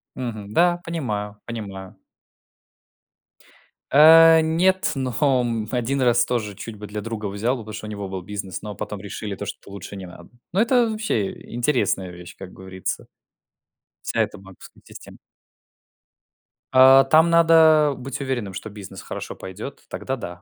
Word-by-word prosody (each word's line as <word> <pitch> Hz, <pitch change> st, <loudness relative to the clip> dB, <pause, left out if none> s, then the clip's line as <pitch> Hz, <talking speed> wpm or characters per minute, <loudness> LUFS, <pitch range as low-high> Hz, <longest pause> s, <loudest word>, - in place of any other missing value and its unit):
Мгм. 110 Hz, -5 st, -6 dB
Да, 175 Hz, +5 st, +3 dB
понимаю 105 Hz, -11 st, -4 dB
понимаю. 100 Hz, -5 st, -7 dB, 1.9 s
А, 160 Hz, +2 st, +8 dB
нет, 185 Hz, +4 st, +2 dB
но, 130 Hz, -2 st, -3 dB, 0.3 s
м 115 Hz, -3 st, -2 dB
1 130 Hz, +2 st, -1 dB
раз 120 Hz, -1 st, +3 dB
тоже 110 Hz, -5 st, -2 dB
чуть 105 Hz, +2 st, -8 dB
бы 105 Hz, 0 st, -8 dB
для 105 Hz, 0 st, -5 dB
друга 110 Hz, 0 st, -5 dB
взял 105 Hz, +6 st, -1 dB
бы, 115 Hz, -, -8 dB
потому 110 Hz, 0 st, -9 dB
что 105 Hz, 0 st, -7 dB
у -, -, -7 dB
него 100 Hz, -2 st, -5 dB
был 95 Hz, -1 st, -5 dB
бизнес, 100 Hz, 0 st, -6 dB
но 105 Hz, -1 st, -7 dB
потом 105 Hz, -2 st, -6 dB
решили 105 Hz, 0 st, -6 dB
то, 100 Hz, -, -6 dB
что -, -, -8 dB
лучше 100 Hz, 0 st, -9 dB
не 95 Hz, -, -7 dB
надо. 85 Hz, -1 st, -14 dB, 0.2 s
Но 195 Hz, -, +3 dB
это 240 Hz, 0 st, +3 dB
вообще 215 Hz, -, -1 dB, 0.2 s
интересная 120 Hz, -7 st, 0 dB
вещь, 90 Hz, 0 st, -12 dB
как 95 Hz, -1 st, -10 dB
говорится. 95 Hz, 0 st, -6 dB, 1.0 s
Вся -, -, 0 dB
эта -, -, -2 dB
банковская 95 Hz, -1 st, -15 dB
система. -, -, -13 dB, 1.6 s
А, 130 Hz, +1 st, +8 dB
там 160 Hz, +4 st, +5 dB
надо 160 Hz, -3 st, +5 dB
быть 135 Hz, +2 st, -6 dB
уверенным, 120 Hz, -8 st, -3 dB
что 100 Hz, +4 st, -7 dB
бизнес 100 Hz, -2 st, -10 dB
хорошо -, -, -7 dB
пойдет, 100 Hz, +9 st, -9 dB
тогда 135 Hz, -, -4 dB
да. 90 Hz, -8 st, -8 dB
110 Hz, 155 wpm, -22 LUFS, 100-140 Hz, 1.9 s, А